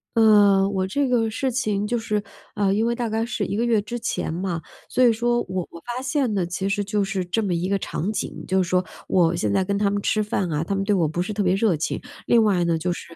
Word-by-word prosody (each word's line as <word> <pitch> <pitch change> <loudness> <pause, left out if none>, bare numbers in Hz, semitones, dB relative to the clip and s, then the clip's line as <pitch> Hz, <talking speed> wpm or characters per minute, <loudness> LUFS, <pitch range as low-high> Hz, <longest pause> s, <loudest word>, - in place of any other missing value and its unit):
呃， 205 -3 +5
我 190 -2 -1
这 275 +9 0
个 235 -3 +2
事 260 +4 -1
情 210 -5 -1
就 240 - 0
是 215 -2 -1 0.3
啊， 200 -2 +1
因 220 +2 +1
为 235 - +1
大 235 -1 -2
概 220 +1 -1
是 235 -2 -2
1 - - -3
个 230 - 0
月 230 -3 +2
之 225 +4 -5
前 195 -7 -3
嘛， 175 -2 -3 0.3
所 255 - 0
以 235 - +5
说 240 +1 +1
我 185 -1 -3
我 170 - -10
发 245 +1 -4
现 265 -3 0
呢， 185 -3 0
其 180 +3 -3
实 205 0 0
就 205 +1 -1
是 195 -1 -1
这 180 +6 -1
么 195 -4 -1
一 175 +2 -1
个 200 0 +1
场 195 +2 -3
景， 210 - -4
就 190 0 +2
是 175 - -1
说 180 0 +2 0.2
我 175 -2 +3
现 105 -10 -1
在 - - +2
跟 200 +2 -1
他 205 -1 +2
们 205 0 -1
吃 215 - +1
饭 195 -4 -1
啊， 150 +2 -1
他 200 - -1
们 195 - 0
对 205 +1 +1
我 175 -5 +2
不 165 +4 -2
是 195 - -3
特 210 - -2
别 185 -1 +2
热 195 -6 +2
情。 155 - -2 0.2
另 230 -2 +4
外 185 -5 +2
呢， 165 -1 +1
就 180 +3 -1
是 170 -1 -7
200 Hz, 290 characters per minute, -23 LUFS, 185-225 Hz, 0.3 s, 呃